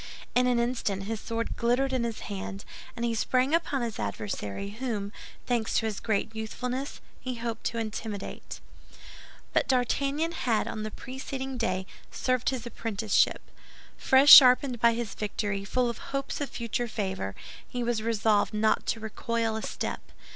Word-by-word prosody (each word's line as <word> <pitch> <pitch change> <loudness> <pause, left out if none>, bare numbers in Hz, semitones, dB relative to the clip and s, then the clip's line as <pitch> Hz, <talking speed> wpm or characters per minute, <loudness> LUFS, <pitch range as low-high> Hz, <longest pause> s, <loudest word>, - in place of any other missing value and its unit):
In 250 0 +4
an 245 -1 +3
instant 235 -5 -1
his 220 +2 -3
sword 230 0 -3
glittered 250 +3 +1
in 255 -2 +1
his 230 -2 -4
hand, 195 0 -6 0.3
and 235 - -2
he 235 - 0
sprang 255 +5 +1
upon 305 -6 +1
his 230 -2 -4
adversary, 105 - -4
whom, 215 -3 -3 0.3
thanks 235 -3 0
to - - +1
his 215 -2 -2
great 220 0 -1
youthfulness, 250 +5 -4 0.2
he 255 -1 -4
hoped 230 -1 -4
to 230 - -1
intimidate. 215 -2 -5 0.9
But - - +2
D'Artagnan 275 +5 +1
had 240 -9 0
on 215 - -4
the 215 - -3
preceding 265 +2 -6
day 190 -6 -1 0.2
served 255 -2 0
his 255 -3 -4
apprenticeship. 220 -3 +1 0.5
Fresh 270 +2 +6
sharpened 255 -1 +9
by 235 0 +5
his 230 -3 -3
victory, 205 -1 -2
full 245 +4 +1
of 235 - -4
hopes 275 +1 -4
of 285 - -2
future 235 +1 -2
favor, 190 - -3 0.3
he 245 -1 -3
was 235 -2 0
resolved 220 -2 +2
not 215 0 +2
to 225 - 0
recoil 225 +1 -2
a 220 - -3
step. - - -4
230 Hz, 160 wpm, -28 LUFS, 215-255 Hz, 0.9 s, sharpened